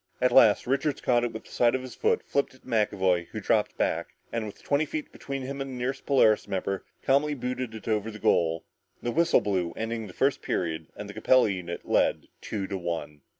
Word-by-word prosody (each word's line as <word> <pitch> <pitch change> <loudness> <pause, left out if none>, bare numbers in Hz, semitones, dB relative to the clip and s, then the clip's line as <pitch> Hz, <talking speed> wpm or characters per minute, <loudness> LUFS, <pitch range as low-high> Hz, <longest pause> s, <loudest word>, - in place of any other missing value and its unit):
At 125 0 +3
last 110 -3 +6
Richards 140 +3 0
caught 120 -1 +2
it 120 - -1
with 110 - -7
the - - -17
side 120 +1 +3
of 130 - -3
his 130 - -8
foot, 450 0 +1
flipped 140 -2 -1
it 130 - -22
to - - -19
McAvoy 95 -6 +1
who - - -6
dropped - - +1
back, - - -1 0.2
and 115 -2 -1
with 105 - -11
twenty 145 +1 +2
feet 155 0 -5
between 135 -1 -5
him 140 +1 -5
and 135 - -4
the 130 - -6
nearest 125 +2 -3
Polaris 110 -8 +4
member, 95 0 -2 0.2
calmly 145 +2 +2
booted 125 -2 -4
it 110 - -10
over 110 0 0
the 105 - -8
goal. 80 -5 +2 0.4
The 120 - -1
whistle 170 +5 +4
blew 90 -5 -1
ending 115 -1 -3
the 90 - -11
first 135 +6 +1
period, 80 -2 -2
and 105 - -7
the 105 - -8
Capella 125 +2 +4
unit 90 -2 -5
led - - +1
two 100 -2 -3
to 95 0 -4
one. 80 -4 -4
115 Hz, 225 wpm, -27 LUFS, 95-130 Hz, 0.4 s, last